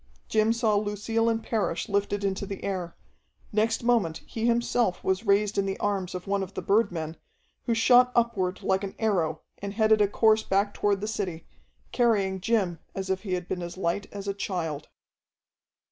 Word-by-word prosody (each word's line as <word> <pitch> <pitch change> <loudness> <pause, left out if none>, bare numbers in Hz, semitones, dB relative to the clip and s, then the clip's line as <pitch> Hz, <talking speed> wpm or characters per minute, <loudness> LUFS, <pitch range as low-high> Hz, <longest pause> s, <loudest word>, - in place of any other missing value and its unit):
Jim 215 +1 +3
saw 230 -2 +2
Lucille 210 +2 0
and 225 0 -1
Parrish 185 -7 -1
lifted 200 0 0
into 195 0 -1
the 195 -1 -6
air; 185 -4 -3 0.6
next 225 +2 +1
moment 225 -10 +1
he 225 +1 -2
himself 235 -4 +1
was 190 +4 0
raised 200 0 +3
in 195 - 0
the 195 - -2
arms 195 -3 -1
of 180 - -6
one 200 0 0
of 190 0 -6
the - - -3
birdmen, 170 -7 +1 0.5
who 230 - +1
shot 250 +2 +5
upward 210 -6 0
like 190 +1 +1
an 195 - -5
arrow 175 -8 0 0.2
and 200 0 -5
headed 220 -1 +4
a 205 - +5
course 220 +2 +3
back 200 0 +1
toward 200 -1 0
the 210 - -2
city, 190 -7 -3 0.5
carrying 200 -6 +2
Jim 195 -6 +1 0.2
as 190 0 -3
if 190 0 -1
he 195 -4 -4
had 180 -1 -5
been 180 - -3
as 175 +1 -6
light 185 +2 -1
as 200 -1 -7
a 200 - 0
child. 165 -7 -4
200 Hz, 185 wpm, -27 LUFS, 190-220 Hz, 0.6 s, shot